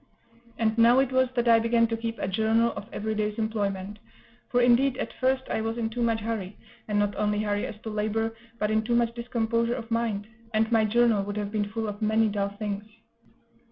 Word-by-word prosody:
And 220 -1 +1
now 235 +2 +6
it 265 -1 +3
was 260 -1 +3
that 240 -1 +1
I 230 -1 +7
began 230 0 +3
to 230 0 -1
keep 225 0 -4
a - - -2
journal 220 +4 +2
of 205 - -8
every 220 +1 -3
day's 210 0 -2
employment; 205 -2 -2 0.5
for, 245 - +2
indeed, 245 +2 +4
at - - -4
first 260 0 +1
I - - -1
was 225 +1 -2
in 225 -1 -2
too 240 +2 -3
much 230 -1 +1
hurry, 210 -3 -4 0.3
and 210 -1 0
not 205 0 +1
only 210 0 0
hurry 205 -1 -1
as 210 - -9
to 220 - -5
labor, 220 +1 -1 0.2
but 210 -1 0
in 220 0 +3
too 235 +2 0
much 235 -1 +2
discomposure 235 0 -1
of 230 0 -7
mind; 225 -3 0 0.3
and 220 +1 +2
my 225 -2 +4
journal 230 -1 +3
would 205 +1 -5
have 205 -1 -3
been 210 -1 -1
full 220 +1 -3
of 205 +1 -6
many 220 +1 +3
dull 200 -1 -1
things. 205 0 -4
225 Hz, 220 wpm, -27 LUFS, 210-235 Hz, 0.5 s, I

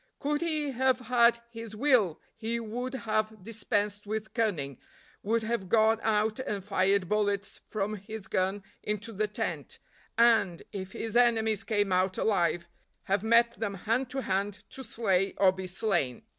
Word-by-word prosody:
Could 295 +2 -1
he 310 -4 0
have 260 0 +2
had 235 -1 +3
his 225 -2 -8
will 215 - +3 0.2
he 225 +1 -2
would 245 +4 -4
have 215 -3 -2
dispensed 210 -1 -2
with 220 +1 -4
cunning, 165 - -1 0.4
would 225 +2 0
have 220 -5 -2
gone 220 +1 +4
out 215 +1 +1
and 205 -7 -3
fired 195 -1 +2
bullets 205 -1 -1
from 210 0 -2
his 210 +1 -7
gun 190 +1 -1 0.2
into 210 +2 -3
the 210 +1 0
tent, 210 - -4 0.4
and, 225 -7 +4
if 190 -2 -6
his 225 -1 -4
enemies 225 -3 +3
came 205 -3 0
out 185 +1 +2
alive, 170 -4 +1 0.4
have 195 +1 0
met 235 +1 +5
them 205 -3 -2
hand 230 +7 -1
to 265 0 -3
hand 200 +2 -1
to 265 - -6
slay 195 -6 +1
or 190 -2 +5
be 185 0 -6
slain. 175 - 0
215 Hz, 155 wpm, -29 LUFS, 195-230 Hz, 0.4 s, met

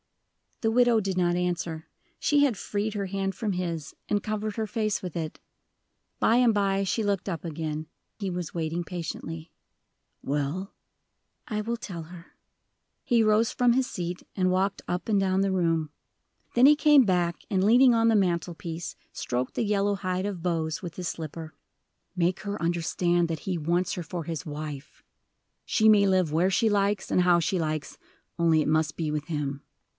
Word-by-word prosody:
The 225 - +2
widow 240 -1 +4
did 195 -3 -2
not 175 -1 +2
answer. 175 -2 -2 0.3
She 290 -1 +3
had 255 -8 +2
freed 205 +3 -2
her 200 -2 -2
hand 195 0 -2
from 210 -1 -2
his, 170 -4 -4
and 205 -1 +1
covered 215 0 -3
her 220 - 0
face 215 -1 -1
with 180 -3 -6
it. 160 -2 -4 0.8
By 225 - +4
and 245 -2 +5
by 195 -1 +1
she 205 +4 0
looked 200 -2 -1
up 165 -5 -4
again 155 -1 -4 0.3
he 200 -2 -2
was 180 -2 -4
waiting 165 +1 -2
patiently. 165 -1 -6 0.7
"Well?" 145 +7 -2 0.7
"I 215 -2 -2
will 235 +2 -2
tell 175 -7 -7
her." 170 +1 -13 0.7
He 235 -3 +3
rose 215 +1 +3
from 245 -2 +3
his 260 +1 +1
seat, 175 0 -5
and 185 -1 +2
walked 190 +1 0
up 180 +1 -3
and 205 -2 +3
down 190 0 +2
the 195 0 +1
room. 165 -4 +1 0.7
Then 245 +3 +7
he 300 - +7
came 295 -3 +6
back, 175 -3 +1
and 190 -3 +1
leaning 245 +4 +6
on 230 0 +3
the 225 - +4
mantel 175 -3 +1
piece, 165 0 -6 0.2
stroked 125 +1 -3
the - - 0
yellow 205 -1 +1
hide 185 -1 -2
of 185 -5 -5
Bose 165 -2 -1
with 170 -2 -6
his 180 -2 -4
slipper. 160 -1 -6 0.6
"Make 180 +1 +1
her 205 0 -4
quite 170 - -3
understand 175 0 +1
that 160 -2 -2
he 185 -2 -2
wants 175 +4 0
her 180 - -4
for 170 0 -5
his 160 -3 -5
wife. 150 -2 -7 0.6
She 220 - +3
may 205 -2 +6
live 185 -5 +2
where 175 +5 +2
she 225 +4 +3
likes 200 -1 +1
and - - +4
how 175 -1 +5
she 175 +3 0
likes, 155 -2 -3 0.4
only 165 -2 +4
it - - -1
must 155 0 +1
be 160 -2 -2
with 150 0 -2
him." 145 -4 -3
180 Hz, 185 wpm, -27 LUFS, 165-205 Hz, 0.8 s, Then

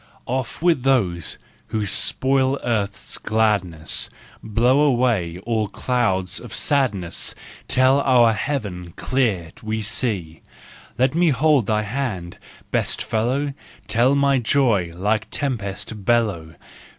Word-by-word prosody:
Off 130 +4 -3
with 170 -6 +3
those 100 - 0 0.3
who 110 -1 -2
spoil 130 +7 +2
earth's 105 -4 -2
gladness, 100 -8 0 0.3
Blow 120 +5 +2
away 120 - +2
all 110 -2 0
clouds 95 -5 -1
of - - -8
sadness, 115 - +1 0.3
Till 130 +2 +4
our 120 -4 +5
heaven 100 - -4
clear 110 -11 -1
we 110 0 -3
see; 100 -8 -2 0.6
Let 130 +1 +2
me 170 +1 +3
hold 140 -3 +3
thy 105 -1 +1
hand, 105 -7 -4 0.3
best - - 0
fellow, 130 +6 -1 0.3
Till 125 +5 +3
my 140 -1 +3
joy 115 -8 +2
like 105 +4 0
tempest 110 -5 -4
bellow! 95 -8 0
115 Hz, 115 wpm, -22 LUFS, 100-130 Hz, 0.6 s, our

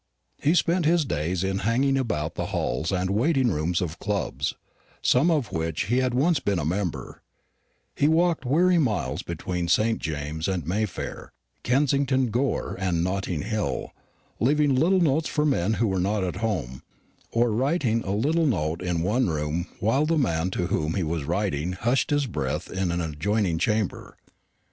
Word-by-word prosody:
He 155 +4 +3
spent 175 -1 +2
his 165 -1 +3
days 85 - -1
in 95 0 -1
hanging 125 +7 +2
about 95 - -1
the - - -3
halls 80 - -1
and 95 0 0
waiting 130 +3 +2
rooms 80 +3 0
of 85 -2 -4
clubs 100 -2 -2
of - - -33 0.5
some 135 +8 +4
of 150 -9 0
which 80 -1 -1
he 120 +6 0
had 130 -1 0
once 150 +3 +3
been 100 -7 0
a 75 - -2
member; 90 +1 -3 0.7
he 145 - +3
walked 165 -1 +2
weary 170 +7 +3
miles 110 - 0
between 90 -1 -3
St 110 +6 +2
James's 80 +3 -3
and 90 -6 -3
Mayfair, 100 +3 -3 0.3
Kensington 135 -1 +2
Gore 125 +3 -1
and 90 -3 0
Notting 90 -3 -2
Hill, 110 0 -2 0.5
leaving 145 +3 +3
little 175 +8 +3
notes 155 0 +2
for 150 -1 0
men 110 - +1
who 110 +2 +1
were 95 -2 0
not 100 +2 0
at 90 - -3
home, 85 - -2 0.5
or 115 0 +2
writing 125 -1 +1
a - - -6
little 155 +9 +2
note 85 - -1
in 90 -2 -1
one 115 +7 +1
room 80 +3 -2
while 135 +8 +2
the 165 0 +2
man 85 - +1
to 90 -1 -2
whom 80 -1 -1
he 95 - 0
was 80 -2 -2
writing 75 +6 -1
hushed 120 +7 0
his 145 -1 +2
breath 115 - -3
in 95 -1 -1
an 85 0 -1
adjoining 85 +3 0
chamber. 105 +2 -1
105 Hz, 170 wpm, -25 LUFS, 85-135 Hz, 0.7 s, some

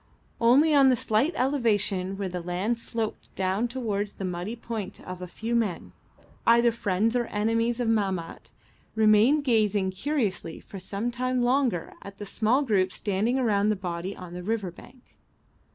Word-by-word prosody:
Only 270 +7 +5
on 275 -2 +6
the 255 - +4
slight 225 +6 +1
elevation 205 -8 +1
where 200 -1 -2
the 180 -1 -4
land 185 +7 -1
sloped 225 -1 -5
down 190 +5 0
towards 215 -5 -3
the 195 - -5
muddy 180 +5 -4
point 225 -4 -6
a 180 0 -6
few 225 +6 -3
men, 215 -7 -1 0.6
either 235 0 +6
friends 220 +1 0
or 240 -1 +1
enemies 230 +3 0
of 240 - 0
Mahmat, 195 -6 -1 0.4
remained 220 +7 +5
gazing 210 -6 +2
curiously 195 - -2
for 195 - -10
some 200 +5 -3
time 255 0 -1
longer 245 -8 +1
at 200 0 -10
the 205 - -7
small 230 +7 +1
group 195 -7 +1
standing 210 +7 0
around 210 -5 +2
the 215 - +2
body 180 0 -5
on 180 -2 -9
the 180 - -6
river 205 -1 -2
bank. 250 +8 -18
215 Hz, 160 wpm, -27 LUFS, 190-240 Hz, 0.6 s, on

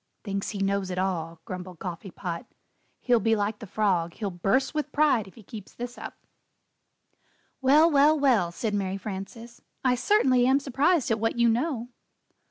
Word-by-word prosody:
"Thinks 195 -2 -3
he 210 - -5
knows 195 -1 0
it 180 - -4
all," 165 -3 -2
grumbled 180 -1 -7
Coffee 180 +3 -6
Pot; 170 -1 -6 0.5
"he'll 245 -2 +3
be 225 +1 +2
like 210 0 -2
the 220 - -9
frog; 185 -5 0
he'll 205 -3 -3
burst 195 - 0
with 300 -1 -2
pride 290 -8 +2
if 190 - -16
he 225 - -14
keeps 205 0 -11
this 245 0 -6
up." - - -8 1.5
"Well, 290 +5 +6
well, 295 +2 +5
well!" 235 -12 +3
said 215 +4 -3
Mary 195 -1 -1
Frances, 215 +4 -8 0.2
"I 255 - +4
certainly 255 - +3
am 270 +2 +4
surprised 280 +2 +1
at 225 - +1
what 225 +2 -1
you 235 0 +4
know." 245 0 -1
220 Hz, 175 wpm, -26 LUFS, 190-255 Hz, 1.5 s, Well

